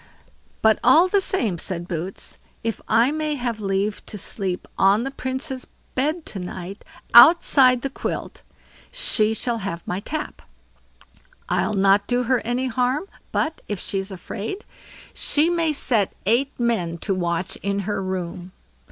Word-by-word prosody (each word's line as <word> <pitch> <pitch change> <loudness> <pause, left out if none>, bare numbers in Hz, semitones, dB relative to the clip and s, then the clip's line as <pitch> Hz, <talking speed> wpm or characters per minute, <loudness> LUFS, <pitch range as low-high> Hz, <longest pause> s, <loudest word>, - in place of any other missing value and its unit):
"But 220 0 +5
all 310 +9 +6
the 395 +1 +2
same", 225 - +2
said 175 -1 -3
Boots; 180 +2 -5 0.2
"if 225 -2 -3
I 235 +4 +4
may 305 -1 -1
have 240 -4 -3
leave 200 +1 -1
to 210 - -6
sleep 190 -2 -3
on 200 +4 +4
the 270 - -3
Princess' 260 0 -5 0.3
bed 305 +5 -1
to 195 - -6
night, 180 +2 -7 0.3
outside 255 -3 +7
the 275 - -1
quilt, - - -5 0.5
she 220 - +1
shall 235 0 -2
have 175 -4 -5
my 180 - -2
tap. 300 +9 -5 1.1
I'll 215 - +1
not 195 +1 +3
do 245 0 +1
her 250 +1 +2
any 245 +3 -2
harm; 255 +4 0 0.3
but, 315 0 -1
if 205 -3 -3
she's 195 +1 -3
afraid, 205 - -6 0.5
she 310 +4 +2
may 335 -2 +1
set 235 -8 +1
eight 245 +7 +2
men 190 -9 0
to 200 - +1
watch 175 -1 -2
in 200 0 -2
her 200 0 -2
room." 185 -1 -5
225 Hz, 150 wpm, -23 LUFS, 195-265 Hz, 1.1 s, outside